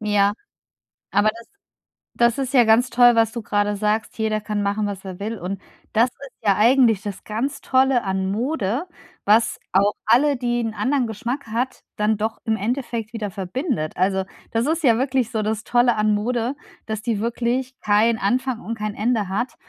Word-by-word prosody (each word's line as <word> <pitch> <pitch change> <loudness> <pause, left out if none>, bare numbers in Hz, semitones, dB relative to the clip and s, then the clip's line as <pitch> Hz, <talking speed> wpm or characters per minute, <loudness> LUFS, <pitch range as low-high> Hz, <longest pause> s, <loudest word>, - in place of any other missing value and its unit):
Ja, 205 -1 +2 0.8
aber 205 +2 +3
das 230 0 -13 0.7
das 235 +1 +3
ist 270 0 -3
ja 245 - +7
ganz 230 +3 +4
toll, 240 0 +6
was 225 -1 +3
du 235 -2 -5
gerade 205 0 0
sagst, 210 +2 -1
jeder 215 -1 0
kann 210 0 -2
machen, 205 +1 0
was 200 -1 -5
er 185 -2 -7
will. 220 +3 -4
Und 190 +1 -5 0.3
das 235 +3 +3
ist 275 +1 -13
ja 200 - +5
eigentlich 230 -2 +4
das 205 -2 -6
ganz 240 +7 -3
Tolle 260 -2 +2
an 190 0 -1
Mode, 245 - -1 0.4
was 225 +2 +3
auch 200 +2 +3
alle, 280 +5 +4
die 240 -1 -1
'n 225 -1 -3
anderen 260 -3 0
Geschmack 235 +4 -4
hat, 240 +4 -2
dann 210 +1 +1
doch 220 +2 -2
im 225 -2 +1
Endeffekt 235 0 -3
wieder 210 -3 -4
verbindet. 195 - -3
Also, 190 +1 +1 0.3
das 230 +3 +1
ist 320 -1 -1
ja 230 -3 +5
wirklich 255 -2 0
so 220 -1 -1
das 220 +1 -2
Tolle 240 -1 +3
an 210 0 +2
Mode, 240 +4 -1 0.3
dass 220 -1 -4
die 230 -4 -1
wirklich 240 +3 -1
kein 215 +2 +3
Anfang 250 +3 0
und 230 +1 -5
kein 210 -1 -3
Ende 215 -2 0
hat 235 +7 -2
225 Hz, 185 wpm, -22 LUFS, 205-245 Hz, 0.8 s, ja